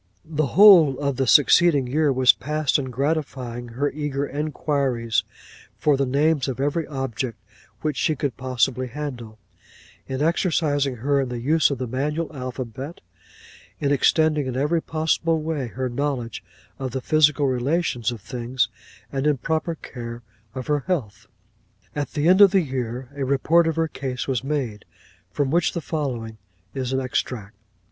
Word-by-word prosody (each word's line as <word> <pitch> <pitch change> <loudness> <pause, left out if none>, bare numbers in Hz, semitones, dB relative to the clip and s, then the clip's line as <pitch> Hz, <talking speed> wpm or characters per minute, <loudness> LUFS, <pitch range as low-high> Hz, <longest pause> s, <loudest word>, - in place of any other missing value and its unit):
'The 155 -2 -1
whole 175 -10 +8
of 140 -2 -1
the 135 -1 0
succeeding 145 +1 +5
year 145 +3 +1
was 130 -1 +5
passed 150 -1 0
in 140 - -3
gratifying 130 -3 -2
her 130 +5 -2
eager 145 -2 -2
inquiries 140 -5 -1 0.5
for 150 -2 +3
the 135 0 0
names 145 +1 +2
of 130 -1 -4
every 145 +3 -1
object 130 -3 -4 0.4
which 150 -3 -2
she 155 - +1
could 145 -6 -2
possibly 130 0 0
handle; 120 -5 -6 0.7
in 130 0 -3
exercising 150 -4 +1
her 140 +4 +1
in 130 - -3
the 120 -1 -4
use 150 +4 +3
of 140 - -2
the 130 - -3
manual 150 +6 -3
alphabet; 130 +3 -6 0.8
in 140 - 0
extending 150 0 +3
in 130 -1 -3
every 150 +5 +1
possible 160 +1 0
way 155 -4 -3
her 130 +2 -3
knowledge 125 -3 -3 0.4
of 135 -1 -3
the 130 +1 -4
physical 150 0 +3
relations 130 -2 0
of 115 -4 -7
things; 125 +2 -2 0.4
and 135 +2 -1
in 150 -2 +2
proper 160 +4 -1
care 120 -4 -8 0.3
of 130 -1 -5
her 150 -1 +1
health. 120 - -3 0.7
'At 145 -1 -3
the 150 0 +1
end 185 +3 +6
of 200 - +10
the 190 0 +3
year 125 -3 -4
a 140 - -3
report 155 +5 +3
of 165 - 0
her 165 0 +1
case 130 -3 -5
was 130 -3 -1
made, 135 -7 -3 0.5
from 140 -2 -1
which 175 +2 +2
the 170 - -2
following 125 -9 -4 0.3
is 130 -2 -3
an 130 - +1
extract. 125 -5 -3
140 Hz, 160 wpm, -23 LUFS, 125-155 Hz, 0.8 s, of